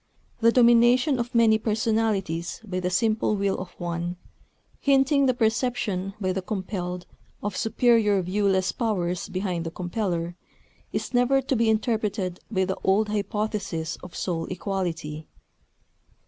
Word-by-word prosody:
The 230 0 +5
domination 245 +3 +5
of 240 +1 -3
many 225 -2 +5
personalities 215 -6 0
by 185 -4 -3
the 180 0 -1
simple 215 +3 +1
will 200 -1 0
of 185 - -6
one, 175 +1 -3 0.6
hinting 275 0 +3
the 255 - +3
perception 220 -4 0
by 185 -2 0
the 190 - -2
compelled 180 -2 -4 0.4
of 205 -2 -2
superior 225 -3 +3
viewless 190 0 +1
powers 180 -7 -2
behind 185 -3 -2
the 165 - -3
compeller, 175 -1 -3 0.6
is - - -3
never 245 +2 +4
to 265 +1 0
be 230 -1 +2
interpreted 215 -5 0
by 190 -4 +1
the 190 0 -2
old 210 +3 +2
hypothesis 205 -5 -2
of 180 - -12
soul 165 -3 -2
equality. 170 -5 -4
205 Hz, 135 wpm, -25 LUFS, 180-225 Hz, 0.6 s, The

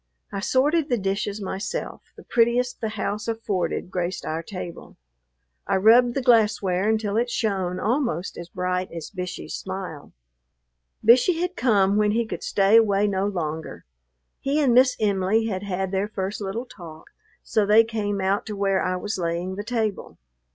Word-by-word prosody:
I 200 - -3
sorted 290 +8 +1
the 245 - +2
dishes 200 +1 -2
myself; 200 - -4 0.2
the - - -12
prettiest 240 +1 +1
the 220 - -1
house 210 0 -3
afforded 210 -5 -2
graced 180 0 -3
our 160 +1 -2
table. 175 -1 -8 0.7
I - - +1
rubbed 235 +5 +5
the 275 - -1
glassware 210 -5 +3
until 215 -1 0
it 240 +1 +1
shone 190 -6 -1
almost 220 - -1
as 170 0 -8
bright 180 +1 -2
as 165 -2 -7
Bishey's 180 -2 -6
smile. 185 -6 -6 0.9
Bishey 255 +9 +5
had 360 +1 -2
come 205 - +3
when 210 0 +2
he 235 +1 +1
could - - -6
stay 200 +2 +4
away 205 -2 +3
no 195 -1 0
longer; 160 - -4 0.5
he 280 +3 0
and 270 -5 +3
Miss 255 +1 +5
Em'ly 205 +1 +1
had 190 -4 -2
had 190 -1 -3
their 195 +1 0
first 200 0 -4
little 205 +5 -3
talk, 165 -9 -12 0.3
so 215 - +1
they 215 +2 +7
came 210 -3 -2
out 195 +1 +1
to 210 - -4
where 195 -1 +1
I 185 - 0
was 205 +2 -4
laying 170 +2 -2
the 205 +2 -5
table. 220 -3 -3
205 Hz, 165 wpm, -24 LUFS, 185-225 Hz, 0.9 s, they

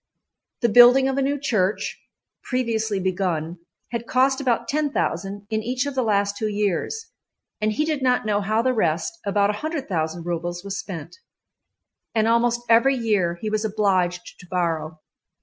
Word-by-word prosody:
The 235 - +3
building 245 +4 +7
of 270 0 0
a - - +2
new 280 +1 0
church, 215 -8 -1 0.4
previously 225 -5 -1
begun, 180 -3 -2 0.3
had 235 -1 -4
cost 265 +1 +2
about 245 -4 0
10,000 205 - -2
in 220 0 0
each 250 +4 -1
of 285 - -3
the 260 - 0
last 205 -3 +1
two 215 +1 -2
years, 210 - -2 0.5
and 215 0 +2
he 300 - 0
did 305 -3 -1
not 250 -3 +2
know 210 -1 +1
how 215 +3 +1
the 255 0 +2
rest, 170 - -1
about 200 0 +2
100,000 190 - -3
rubles, 175 +1 -3
was 200 0 -4
spent, 180 - -7 1.0
and 220 0 +3
almost 235 +1 +2
every 235 +4 +5
year 205 -8 +1
he 215 - -2
was 215 0 0
obliged 190 -5 0
to 180 - -14
borrow. 165 -3 -2
215 Hz, 160 wpm, -23 LUFS, 185-250 Hz, 1.0 s, building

